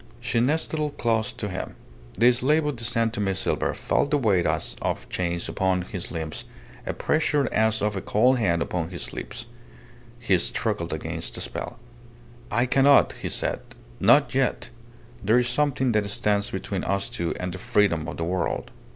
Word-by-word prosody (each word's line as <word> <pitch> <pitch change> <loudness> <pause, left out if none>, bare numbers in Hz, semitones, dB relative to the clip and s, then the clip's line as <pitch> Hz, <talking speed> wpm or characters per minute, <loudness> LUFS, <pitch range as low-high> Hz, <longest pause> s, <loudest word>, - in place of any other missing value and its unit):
She 115 - 0
nestled 150 +3 0
close 115 -2 +1
to 105 - -4
him. 95 -2 -5 0.4
The 120 +2 +6
slave 150 +6 +2
of 150 -4 -2
the 115 - -4
San 115 -1 +1
Tome 100 -3 -1
silver - - 0
felt 145 - 0
the 150 - +3
weight 100 -10 +2
as - - -1
of - - -2
chains 85 -1 -2
upon 95 -2 0
his 90 -1 -5
limbs, 80 -2 -5 0.4
a - - -1
pressure 150 -3 +1
as 110 -1 +2
of 105 0 0
a 95 - -2
cold 125 +7 +3
hand 85 -6 +2
upon 85 -2 -3
his 90 -2 -6
lips. 120 0 -6 0.7
He 100 -7 +2
struggled - - -1
against - - -4
the - - -4
spell. 120 - -5 0.7
"I 120 +3 +2
cannot," 135 +2 +5
he - - -2
said. - - -1 0.4
"Not 120 +8 +5
yet. 135 -1 0 0.5
There 110 +4 +4
is 125 0 +2
something 130 0 +1
that 105 -2 +1
stands 100 0 +1
between 95 0 -3
us 100 0 0
two 100 -9 -3
and 90 -1 -3
the 95 - -7
freedom 85 -5 +1
of 85 - -6
the 85 - -2
world." 90 +2 -2
110 Hz, 175 wpm, -25 LUFS, 95-125 Hz, 0.7 s, The